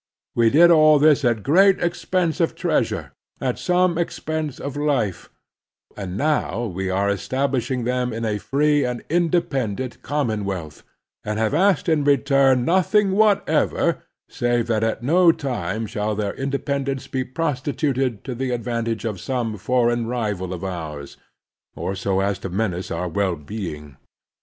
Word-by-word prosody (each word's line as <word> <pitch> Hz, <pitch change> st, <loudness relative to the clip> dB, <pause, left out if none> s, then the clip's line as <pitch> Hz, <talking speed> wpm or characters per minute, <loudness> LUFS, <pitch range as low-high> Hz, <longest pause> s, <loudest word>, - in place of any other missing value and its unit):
We 115 Hz, -1 st, +4 dB
did 170 Hz, +7 st, +6 dB
all 155 Hz, -2 st, +6 dB
this 150 Hz, 0 st, +4 dB
at 115 Hz, -4 st, +1 dB
great 190 Hz, +7 st, +5 dB
expense 175 Hz, 0 st, -1 dB
of 165 Hz, -, +1 dB
treasure, -, -, -1 dB, 0.3 s
at 125 Hz, -2 st, -2 dB
some 180 Hz, -1 st, +2 dB
expense 155 Hz, -4 st, -3 dB
of 140 Hz, 0 st, -5 dB
life; 140 Hz, -, -1 dB, 0.7 s
and 95 Hz, -2 st, -5 dB
now 130 Hz, -5 st, 0 dB
we 95 Hz, -2 st, -3 dB
are 100 Hz, +2 st, +1 dB
establish 130 Hz, +6 st, -1 dB
ing 125 Hz, -2 st, -1 dB
them 125 Hz, +1 st, -1 dB
in 115 Hz, +1 st, -3 dB
a 105 Hz, -1 st, -1 dB
free 145 Hz, +3 st, +2 dB
and 125 Hz, -1 st, -3 dB
independent 135 Hz, -, 0 dB
common 120 Hz, -8 st, -1 dB
wealth, 90 Hz, -6 st, -5 dB, 0.4 s
and 105 Hz, 0 st, -3 dB
have 110 Hz, +3 st, 0 dB
asked 190 Hz, +3 st, +2 dB
in 155 Hz, -3 st, +2 dB
return 135 Hz, -2 st, +3 dB
nothing 190 Hz, -, +3 dB
whatever 210 Hz, 0 st, +2 dB, 0.3 s
save 120 Hz, -1 st, 0 dB
that 110 Hz, -2 st, 0 dB
at 110 Hz, +1 st, -1 dB
no 170 Hz, +5 st, +5 dB
time 115 Hz, -, -3 dB
shall 105 Hz, 0 st, -2 dB
their 100 Hz, -1 st, -2 dB
independence 140 Hz, 0 st, -2 dB
be 130 Hz, -1 st, -2 dB
prostituted 130 Hz, -4 st, -2 dB
to 130 Hz, -, -5 dB
the 130 Hz, +2 st, -3 dB
advantage 115 Hz, -1 st, -2 dB
of 105 Hz, -6 st, -3 dB
some 120 Hz, -4 st, -2 dB
foreign 120 Hz, +2 st, +1 dB
rival 105 Hz, -7 st, -2 dB
of 90 Hz, -1 st, -5 dB
ours, 80 Hz, -6 st, -6 dB, 0.6 s
or 95 Hz, -, -3 dB
so 95 Hz, 0 st, -1 dB
as 100 Hz, 0 st, -1 dB
to 95 Hz, -, -5 dB
menace 95 Hz, -1 st, -2 dB
our 90 Hz, +2 st, -2 dB
well 95 Hz, 0 st, 0 dB
being. 75 Hz, -, -7 dB
125 Hz, 150 wpm, -22 LUFS, 105-145 Hz, 0.7 s, did